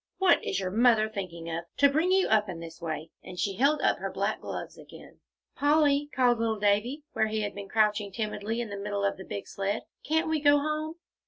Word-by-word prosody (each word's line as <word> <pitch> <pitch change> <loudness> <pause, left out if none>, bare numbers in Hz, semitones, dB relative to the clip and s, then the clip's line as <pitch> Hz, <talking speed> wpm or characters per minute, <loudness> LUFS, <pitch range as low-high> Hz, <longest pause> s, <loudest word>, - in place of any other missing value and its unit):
What 375 -3 +4
is 190 - -1
your 185 -1 -3
mother 225 0 +4
thinking 180 -6 -6
of, 165 +1 -4
to 285 - +6
bring 315 +6 +1
you 380 0 +4
up 210 -2 +2
in 175 -3 -5
this 165 +1 -10
way?" 160 -1 -4
And 180 - -10
she 195 +2 0
held 280 +4 +3
up - - +2
her - - -4
black - - -2
gloves - - -6
again. - - -14 0.4
"Polly," 290 0 +3
called 245 -2 +3
little 225 -1 0
Davie, 210 +8 +1
where 220 - +1
he 215 0 -2
had 205 -1 -3
been 200 -1 -8
crouching 210 -1 +1
timidly 215 +2 -3
in 230 -3 -5
the 200 - -4
middle 200 0 -2
of 200 - 0
the 190 - -8
big 200 - -6
sled, 200 +2 -2 0.2
"can't 320 +2 +1
we 315 -1 +1
go 290 0 +5
home?" 305 +2 -2
220 Hz, 225 wpm, -28 LUFS, 200-285 Hz, 0.4 s, to